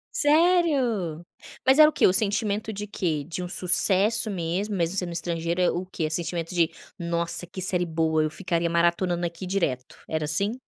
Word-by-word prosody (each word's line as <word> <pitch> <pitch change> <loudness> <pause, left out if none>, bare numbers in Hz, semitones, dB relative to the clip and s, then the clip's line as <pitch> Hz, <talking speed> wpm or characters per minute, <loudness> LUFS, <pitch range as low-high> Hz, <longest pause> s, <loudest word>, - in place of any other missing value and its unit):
Sério! 290 - +2 0.4
Mas 265 +3 +5
era 305 0 +9
o - - -4
que, - - +2
o 185 - +5
sentimento 210 +1 0
de 210 0 -5
quê? 165 -8 -2
De 180 +1 -5
um 180 - -5
sucesso 195 +5 +1
mesmo 190 +3 -2
mesmo 170 0 -1
sendo 180 -3 -2
estrangeiro 170 0 -2
é 180 - +3
o 180 +2 -4
quê? 180 - -5
É - - +1
o - - -7
sentimento 170 0 -3
de: 170 -2 +3 0.3
"Nossa 170 0 -3
que 185 - -9
série 180 -1 0
boa, 160 -1 +1
eu 155 - 0
ficaria 170 0 -1
maratonando 170 +1 +1
aqui 170 +2 -5
direto", 145 -10 -2
era 155 -1 -2
assim? 200 +9 -1
180 Hz, 190 wpm, -25 LUFS, 170-200 Hz, 0.4 s, era